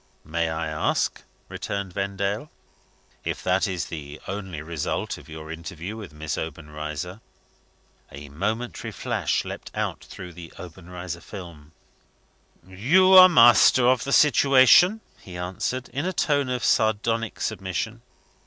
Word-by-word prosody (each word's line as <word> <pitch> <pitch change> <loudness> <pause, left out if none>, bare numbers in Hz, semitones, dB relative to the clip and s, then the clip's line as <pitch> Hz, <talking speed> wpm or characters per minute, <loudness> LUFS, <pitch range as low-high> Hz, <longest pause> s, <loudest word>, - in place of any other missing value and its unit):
"May 80 +2 -1
I 80 0 -3
ask," 75 0 -1 0.3
returned 100 -2 -5
Vendale, 100 +6 -2 0.7
"if - - -4
that 95 +2 +2
is 90 -3 -3
the 75 -2 -8
only 95 -5 -5
result 80 -2 -3
of 70 - -16
your 80 0 -8
interview 85 +4 -7
with 105 -6 -9
Miss 75 +1 -4
Obenreizer?" 75 +4 -6 0.9
A 70 +1 -10
momentary 110 - -3
flash - - -1
leapt - - -7
out - - -3
through 90 -1 -10
the 85 -1 -11
Obenreizer 90 0 -8
film. 85 -6 -11 0.9
"You 145 - +3
are 185 0 +11
master 120 -3 +6
of 130 -1 +3
the 140 - -4
situation," 145 - +6 0.2
he 90 -2 -10
answered, 95 +8 -3
in 145 +8 -3
a 185 - -2
tone 145 -5 +1
of 125 -1 -2
sardonic 115 +1 +1
submission. 110 +2 -3
95 Hz, 130 wpm, -24 LUFS, 80-120 Hz, 0.9 s, are